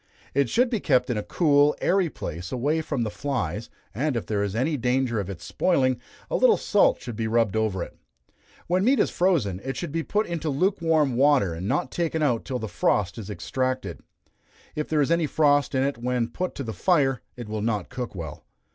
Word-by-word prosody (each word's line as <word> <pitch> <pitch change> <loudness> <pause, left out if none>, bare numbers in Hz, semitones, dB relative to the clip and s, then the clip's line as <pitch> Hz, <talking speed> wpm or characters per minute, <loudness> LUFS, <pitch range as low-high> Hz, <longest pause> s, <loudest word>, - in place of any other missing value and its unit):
It 140 -3 +2
should 245 - +2
be 225 - +1
kept 130 -7 +2
in 115 - -1
a - - -1
cool, 145 - +3
airy 185 -2 +2
place, 90 - -6
away 145 +6 0
from 145 -6 -2
the 110 - -3
flies, 110 - -3 0.2
and 135 +2 0
if - - -3
there 105 -2 -1
is 100 0 -2
any 140 +7 +1
danger 125 -2 0
of 100 -2 -4
its 90 -4 -7
spoiling, 130 -9 +1 0.3
a - - -2
little - - +5
salt 205 - +3
should 120 -3 -7
be 110 +1 -2
rubbed 110 -3 +1
over 105 -5 0
it. - - -10 0.7
When 180 +2 +1
meat 260 +3 +4
is - - +2
frozen, 140 - +1
it 135 0 -4
should 170 -4 -4
be 165 +2 -1
put 210 +6 0
into 165 -2 -3
lukewarm 160 -4 +1
water, 135 - +4
and 85 +4 -5
not 175 - 0
taken 160 -2 -1
out 125 -6 +1
till 130 - -2
the 110 -2 -4
frost 100 0 0
is 105 - -7
extracted. 130 +4 -2 0.7
If 150 - -3
there 155 -1 +2
is 145 - +1
any 170 -2 +2
frost 145 -2 +2
in 130 - +2
it 140 -3 -1
when 120 -1 -1
put 180 +9 -4
to 140 - -4
the 110 -3 -5
fire, 135 - +2 0.2
it 120 -3 -7
will 110 0 -3
not 105 -4 -1
cook 125 -5 -5
well. 80 -5 -7
130 Hz, 215 wpm, -25 LUFS, 110-160 Hz, 0.7 s, little